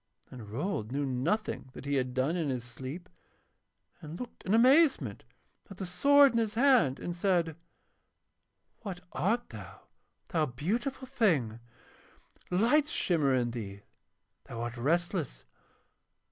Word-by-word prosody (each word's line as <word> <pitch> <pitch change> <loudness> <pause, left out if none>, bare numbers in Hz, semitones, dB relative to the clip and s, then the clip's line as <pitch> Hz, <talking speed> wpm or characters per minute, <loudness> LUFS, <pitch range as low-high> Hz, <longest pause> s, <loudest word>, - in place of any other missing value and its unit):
And 115 -5 -10
Rold 120 - -3
knew 140 +1 -1
nothing 135 - -2
that - - -10
he 140 - -2
had 130 -2 -1
done 135 +6 +1
in 165 -5 -1
his 125 -3 -2
sleep, 130 +8 -8 0.9
and 155 +1 -8
looked 250 - -8
in 195 - +1
amazement 270 +6 +4 0.4
at 195 - -10
the 190 - -4
sword 280 +10 +5
in 230 - +1
his 220 -1 -1
hand 240 - +4
and 175 - -4
said: 175 -3 +1 1.2
'What 190 -5 -7
art 230 +6 0
thou, - - -10 0.5
thou 160 -3 +1
beautiful 230 - -3
thing? 165 - +1 0.9
Lights 245 +11 +3
shimmer 150 -7 +1
in 120 -2 0
thee, 100 -4 -7 0.6
thou 115 -1 -7
art 120 0 -4
restless. 160 - -1
170 Hz, 130 wpm, -30 LUFS, -, 1.2 s, sword